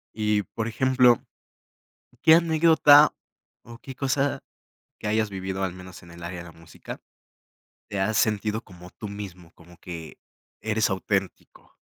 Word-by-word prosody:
Y, 105 -1 +1
por 115 0 -5
ejemplo, 125 0 +3 1.0
¿qué 160 - +7
anécdota 160 -3 +5 0.5
o 115 0 -12
qué 130 +2 -10
cosa 135 +1 -1 0.6
que - - -7
hayas 110 0 +1
vivido, 95 0 -4
al 95 - -2
menos 90 -1 -12
en 85 - -15
el 85 0 -12
área 85 +1 -6
de - - -9
la 85 - -12
música, 80 0 -11 0.9
te 100 - -4
has 110 +2 +1
sentido 110 -1 0
como 90 -2 -14
tú 105 - -8
mismo, 95 -4 -9
como 85 0 -18
que 85 -3 -9 0.4
eres 110 -1 0
auténtico? 95 - -3
105 Hz, 145 wpm, -25 LUFS, 90-120 Hz, 1.0 s, qué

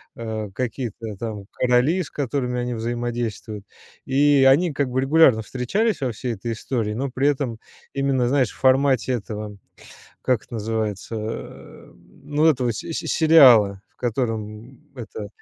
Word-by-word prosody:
э, 110 -2 -5
какие-то 115 -3 -4
там 105 -2 -6
короли, 125 +8 +2
с - - -10
которыми 125 -3 -2
они 125 0 -3
взаимодействуют, 115 -3 -4 0.4
и 140 0 +4
они 165 +6 +3
как 140 -2 -1
бы 130 +1 0
регулярно 135 -4 +5
встречались 165 - -1
во 130 -2 0
всей 120 +2 -4
этой 115 +3 -4
истории. 115 -2 -3
Но 135 +5 -2
при 135 +3 +1
этом 130 -6 -1 0.3
именно, 135 -3 +1
знаешь, 130 -3 +2
в - - -17
формате 130 -1 +3
этого, 105 -2 -5 0.6
как 125 -4 0
это - - -14
называется, 110 -1 -3
э, 110 +1 -8 0.3
ну, 150 +2 0
этого 130 -6 +3
си 115 +9 -6
си - - -4
сериала, 125 - +6
в - - -42
котором 115 0 -4 0.2
это 110 -4 -7
125 Hz, 150 wpm, -22 LUFS, 110-135 Hz, 0.6 s, сериала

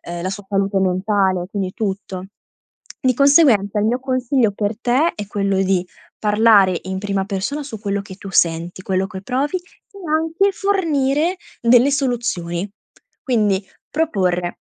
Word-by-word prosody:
ehm, 175 0 -6
la 185 - -2
sua 195 0 -7
salute 195 0 0
mentale, 190 -1 +1
quindi 195 -3 -3
tutto. 195 -3 -4 0.8
Di 255 - +4
conseguenza 245 - +4
il 210 - +1
mio 245 +3 +1
consiglio 255 -3 +1
per 205 +1 -2
te, 260 +8 +2
è 210 - -5
quello 200 -1 0
di 185 -1 +1 0.3
parlare 210 -4 +4
in 190 0 -4
prima 195 -1 -1
persona 210 +9 -3
su 225 -7 -8
quello 200 -1 -2
che 195 -1 -10
tu 195 0 -9
senti, 170 +1 +1
quello 190 0 0
che 190 -2 -8
provi, 270 - -1
e 365 +2 -20
anche 325 +6 +1
fornire 335 -4 +1 0.2
delle 245 +3 +5
soluzioni. 225 -10 -1 0.5
Quindi 210 -6 +1 0.3
proporre: 185 - 0
205 Hz, 145 wpm, -20 LUFS, 190-265 Hz, 0.8 s, delle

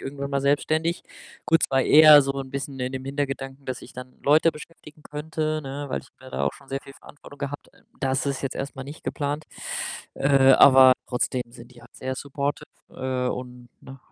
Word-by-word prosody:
irgendwann 140 0 -6
mal 140 -1 0
selbstständig.“ 155 +4 0 0.4
Gut, 165 +2 +3
es - - -3
war 135 -1 +3
eher 150 -1 +8
so 135 - -2
'n 135 -1 -5
bisschen 140 0 -5
in 125 0 -3
dem 130 0 -5
Hintergedanken, 135 -1 -4
dass 130 -1 -5
ich - - -12
dann 125 0 -10
Leute 155 +3 +4
beschäftigen 150 -1 -13
könnte, 155 +1 -3
ne, 140 0 -6
weil - - -2
ich - - -18
mir 130 0 -13
da - - -2
auch - - 0
schon 135 - -17
sehr 135 0 -3
viel 135 - -13
Verantwortung 145 0 -15
gehabt. 145 0 -6 0.3
Das 135 +1 0
ist 140 -1 -2
jetzt 135 - -3
erst 140 0 -5
mal 135 - -6
nicht 145 +3 -10
geplant, 145 +1 -3 0.7
äh, 135 -1 +5
aber 130 -1 +8 0.2
trotzdem 125 0 -1
sind 120 +1 -14
die 120 - -16
halt - - -19
sehr 130 0 -4
supportive, 140 +1 -4 0.3
äh, 130 -1 -2
und 125 -1 -7
ne? 135 0 -12
135 Hz, 205 wpm, -24 LUFS, 130-145 Hz, 0.7 s, eher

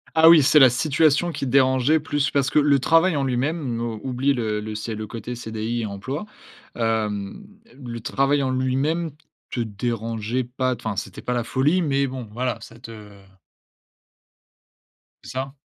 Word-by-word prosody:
Ah 160 +1 +8
oui, 165 -2 +8
c'est 150 +2 +5
la 130 - +8
situation 155 +5 +2
qui 140 - -4
te 125 - -3
dérangeait 130 +3 +4
plus, 145 -1 -1
parce 135 -2 +1
que, - - 0
le 145 -1 +4
travail 165 +5 +3
en 140 - 0
lui-même 130 0 -1 0.2
oublie 135 +2 0
le 110 -4 -2
le 105 0 -6
c'est 110 +1 -4
le 110 0 -5
côté 115 +2 -6
CDI 115 0 -4
et - - -2
emploi, 110 - -5 0.5
hem, 110 - -2 0.3
le 120 -4 -7
travail 135 +5 +1
en 135 - 0
lui-même 135 +6 0 0.4
te - - -3
dérangeait 115 +2 -2
pas, 130 +1 -2
t 120 - -16
enfin, 110 -2 -2
c'était 95 -1 -6
pas 125 - -2
la 120 -1 -1
folie, 145 +10 +1
mais 140 -4 +1
bon, 130 -3 -6
voilà, 125 +2 -2
ça 115 - -13
te 105 -4 -12 2.0
C'est - - -10
ça? 135 +1 -4
130 Hz, 170 wpm, -23 LUFS, 115-140 Hz, 2.0 s, Ah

